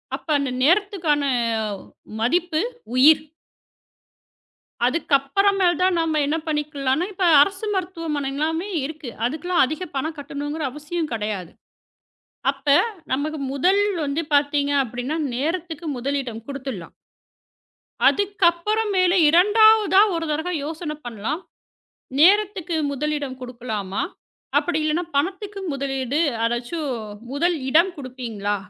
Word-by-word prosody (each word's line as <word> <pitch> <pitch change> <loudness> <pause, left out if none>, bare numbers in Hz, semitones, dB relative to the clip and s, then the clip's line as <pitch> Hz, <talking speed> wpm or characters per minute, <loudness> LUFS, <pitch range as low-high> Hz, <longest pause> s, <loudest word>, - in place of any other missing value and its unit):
அப்ப - - -12
அந்த 275 -2 -2
நேரத்துக்கான 340 -2 +2 1.0
மதிப்பு 320 +7 +1 0.3
உயிர். 300 +4 +7 1.7
அதுக்கப்பறமேல் 345 +6 +2
தான் 370 0 +3
நாம 320 -2 +1
என்ன 300 +3 0
பண்ணிக்கலானா, 295 0 -1
இப்ப 370 0 0 0.2
அரசு 390 +7 +1
மருத்துவமனை 330 -6 -2
எல்லாமே 320 +6 -1 0.2
இருக்கு. 300 -3 -7 0.2
அதுக்லாம் 340 +6 +1
அதிக 310 +7 -5
பணம் 310 +4 -2
கட்டணுங்கற 290 +1 -5
அவசியம் 300 +2 -4
கிடையாது. 210 -5 -3 1.0
அப்ப 275 +1 -18 0.5
நமக்கு 300 +3 -2
முதல் 370 +9 +3 0.2
வந்து 285 +3 -1
பார்த்தீங்க 285 0 +2
அப்டின்னா 245 +5 -4 0.2
நேரத்துக்கு 325 +4 -3
முதலிடம் 255 -3 -3
குடுத்துடலாம். 265 -11 -6 1.1
அதுக்கப்பறமேல் 395 0 +2
2ஆவதா 415 +3 +6
ஒரு 330 0 -2
தடவை 320 +4 -2
யோசனை 310 0 -5
பண்ணலாம். 240 - -4 0.8
நேரத்துக்கு 375 0 +3
முதலிடம் 285 -2 -3
கொடுக்கலாமா? 230 -6 -4 0.6
அப்படி 350 -3 -1
இல்லைன்னா 310 +3 0
பணத்துக்கு 390 +6 -2
முதலீடு 270 0 -2 0.2
அதாச்சும் 240 +7 -2 0.4
முதல் 340 +5 +1
இடம் 335 +6 +4
குடுப்பீங்களா? 240 -7 -4
305 Hz, 100 wpm, -22 LUFS, 275-350 Hz, 1.7 s, உயிர்